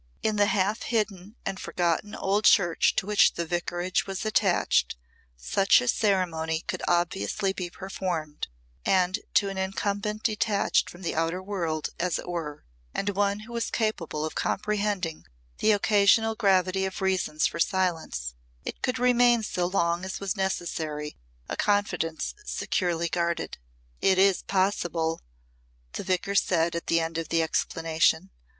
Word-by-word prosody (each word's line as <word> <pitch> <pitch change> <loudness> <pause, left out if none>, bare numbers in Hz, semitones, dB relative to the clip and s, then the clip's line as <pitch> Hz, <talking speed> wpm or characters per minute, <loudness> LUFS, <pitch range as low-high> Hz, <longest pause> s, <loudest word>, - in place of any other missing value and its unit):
In 215 - +1
the 205 0 +4
half 205 +2 +1
hidden 210 -3 -2
and 190 - -3
forgotten 175 +4 -1
old 200 +2 0
church 175 -4 +4
to - - 0
which 210 0 +4
the 170 - -2
Vicarage 175 +2 -1
was 195 +1 -4
attached 215 - +2 0.4
such 195 - +4
a 250 - -3
ceremony 170 -8 +1
could - - -4
obviously 175 - 0
be 180 -2 -4
performed, 175 -5 -4 0.4
and 185 -1 +2 0.2
to 200 - +4
an 195 -1 -4
incumbent 200 +2 -2
detached 215 -2 +1
from 175 +2 -12
the 170 - -1
outer 165 +3 0
world, 170 -6 -2
as 175 -1 0
it - - -8
were, 160 -4 -5 0.3
and 195 - 0
one 200 +1 0
who 230 +2 -11
was 235 -1 -1
capable 170 -9 -1
of 155 - -4
comprehending 205 -5 -1 0.4
the 220 - +4
occasional 210 +2 +4
gravity 190 -3 +2
of 190 - -4
reasons 185 -5 0
for - - -1
silence, 165 - -1 0.3
it - - -6
could 255 0 0
remain 245 -1 +4
so 180 -4 -1
long 170 -1 0
as 190 0 -4
was 200 0 -2
necessary 160 -6 -3 0.3
a - - -3
confidence 205 -6 0
securely 170 - -1
guarded. 170 - -2 0.4
"It 190 -1 +4
is 195 0 +4
possible," 175 -4 0 0.7
the - - -4
Vicar 185 +1 -1
said 170 -4 +2
at 170 - -4
the 165 - +3
end 165 0 -2
of 165 - -5
the 165 -1 +2
explanation. 160 +2 +1
185 Hz, 150 wpm, -27 LUFS, 170-205 Hz, 0.7 s, the